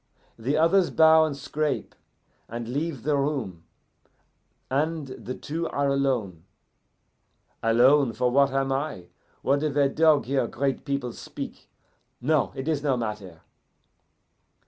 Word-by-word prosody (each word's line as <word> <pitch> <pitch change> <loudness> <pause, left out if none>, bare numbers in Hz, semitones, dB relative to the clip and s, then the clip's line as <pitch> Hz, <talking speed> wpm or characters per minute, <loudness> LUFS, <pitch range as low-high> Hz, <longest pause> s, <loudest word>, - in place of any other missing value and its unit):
The 135 +7 0
others 170 +3 +4
bow 160 0 +6
and 145 -3 -4
scrape, 150 0 -2 0.6
and 115 0 -5
leave 145 +1 -3
the 150 +1 +1
room, 135 - -2 1.0
and 155 +3 -1
the 130 0 -7
two 165 +3 -4
are 140 0 0
alone 125 -12 -1 1.2
alone, 125 +3 +4
for 125 +3 0
what 140 +1 +4
am 135 0 0
I? 135 - -3 0.3
What 140 +1 +2
if 150 -2 -1
a 140 -1 +3
dog 155 0 +3
hear 135 +1 0
great 135 -1 -2
people 140 -4 -2
speak? - - -9 0.5
No, 145 +1 +1
it 135 +2 -5
is 155 -3 0
no 140 -3 +1
matter! 105 -8 -5
140 Hz, 130 wpm, -26 LUFS, 125-150 Hz, 1.2 s, bow